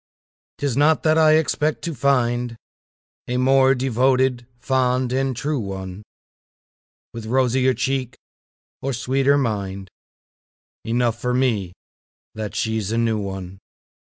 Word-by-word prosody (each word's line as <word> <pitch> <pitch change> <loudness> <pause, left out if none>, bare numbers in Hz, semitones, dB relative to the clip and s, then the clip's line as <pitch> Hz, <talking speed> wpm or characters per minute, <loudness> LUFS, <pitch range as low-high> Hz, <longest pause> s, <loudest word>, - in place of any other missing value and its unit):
'Tis 140 -4 -1
not 150 +3 +3
that 155 0 +3
I 155 -1 +5
expect 155 -1 +1
to 170 - -3
find 120 -3 0 0.7
A 125 - -1
more 135 +1 +4
devoted, 130 -1 +1
fond 125 -1 0
and 135 0 0
true 145 +3 -2
one, 95 -2 -6 1.1
With 115 -1 -7
rosier 130 +1 +2
cheek 130 -2 -2 0.7
or 135 0 -2
sweeter 135 +4 +2
mind 100 -7 -3 0.9
Enough 120 0 0
for 125 0 0
me 110 -9 0 0.6
that 110 -1 -6
she's 110 -2 -1
a 115 - 0
new 115 -2 +1
one. 95 -2 -6
125 Hz, 120 wpm, -22 LUFS, 110-135 Hz, 1.1 s, I